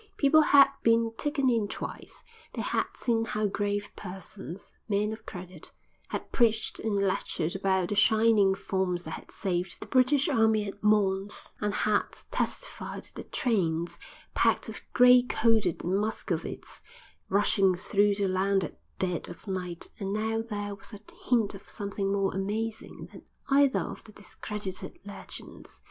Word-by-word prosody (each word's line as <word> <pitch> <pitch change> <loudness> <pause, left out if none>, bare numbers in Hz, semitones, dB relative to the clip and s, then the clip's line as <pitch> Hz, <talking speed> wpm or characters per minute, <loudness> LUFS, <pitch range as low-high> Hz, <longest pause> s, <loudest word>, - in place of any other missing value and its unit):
People 310 +2 +6
had 280 -2 +7
been 230 0 +3
taken 290 0 0
in 230 -4 +2
twice; - - -7 0.3
they - - -3
had - - 0
seen 230 -2 +1
how 215 -1 -1
grave 205 0 -1
persons, 190 -1 -9 0.2
men 210 +1 +1
of 220 - -11
credit, 180 -2 -8 0.4
had - - -5
preached 225 -3 +2
and 220 -2 -1
lectured 185 -4 -1
about 190 -2 +1
the - - 0
shining 215 -2 +4
forms 190 -2 -1
that - - -7
had - - -8
saved 180 -2 -2
the - - -7
British 265 +4 +3
Army 220 -6 +3
at 200 +1 -8
Mons, 205 -1 +1
or 210 - +1
had 210 0 +2 0.3
testified - - -3
to - - -11
the - - -7
trains, 170 -8 0 0.3
packed - - +2
with - - -7
gray 250 0 +7
coated 225 -6 +1
Muscovites, 205 +5 -3 0.5
rushing 195 -1 +3
through 205 +3 +2
the 200 -1 +1
land 190 +1 +1
at 75 - -7 0.2
dead 180 -2 -2
of - - -11
night: 180 -3 -4
and 195 -1 -3
now 220 +2 0
there 205 -3 -4
was 200 +3 -11
a 205 - -8 0.3
hint 230 -5 +3
of 195 - -12
something 200 -1 -3
more 195 -1 +1
amazing 215 +3 -4
than - - -12 0.3
either 275 -1 +5
of - - -6
the 215 - -12
discredited 205 -2 -7
legends. 200 -1 -8
205 Hz, 155 wpm, -28 LUFS, 190-225 Hz, 0.5 s, had